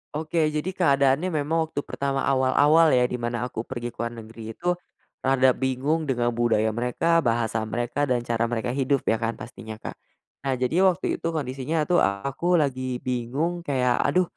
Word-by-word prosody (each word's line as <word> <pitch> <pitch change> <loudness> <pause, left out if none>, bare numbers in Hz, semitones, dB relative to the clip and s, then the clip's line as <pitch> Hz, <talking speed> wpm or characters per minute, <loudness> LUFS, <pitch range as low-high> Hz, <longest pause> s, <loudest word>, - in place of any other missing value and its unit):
Oke, 160 +1 0
jadi 150 +4 -1
keadaannya 140 -2 +2
memang 160 0 0
waktu 145 -2 -4
pertama 140 -1 -2
awal-awal 145 +3 +4
ya, 125 - +4
di 125 - -2
mana 120 0 -2
aku 120 -2 -5
pergi 120 -2 -5
ke - - -35
luar 115 0 -3
negeri 110 0 -9
itu, 175 +1 0 0.5
rada 130 -1 +4
bingung 135 +5 -1
dengan 120 -2 +1
budaya 115 -2 +1
mereka, 125 +9 +1
bahasa 115 -5 0
mereka, 120 +5 -1
dan 120 -2 0
cara 115 -1 0
mereka 120 +1 -2
hidup, 135 +1 0
ya 110 - +1
kan 115 0 -2
pastinya 110 -1 -9
Kak. 110 - -8 0.5
Nah, 135 - +1
jadi 125 +7 0
waktu 180 - 0
itu - - -3
kondisinya 140 +2 -1
tuh 175 +3 +2
aku 140 - 0
lagi 130 -5 -1
bingung, 130 +8 -2
kayak, 125 -3 +1
aduh, 185 0 +3
130 Hz, 175 wpm, -25 LUFS, 120-150 Hz, 0.5 s, awal-awal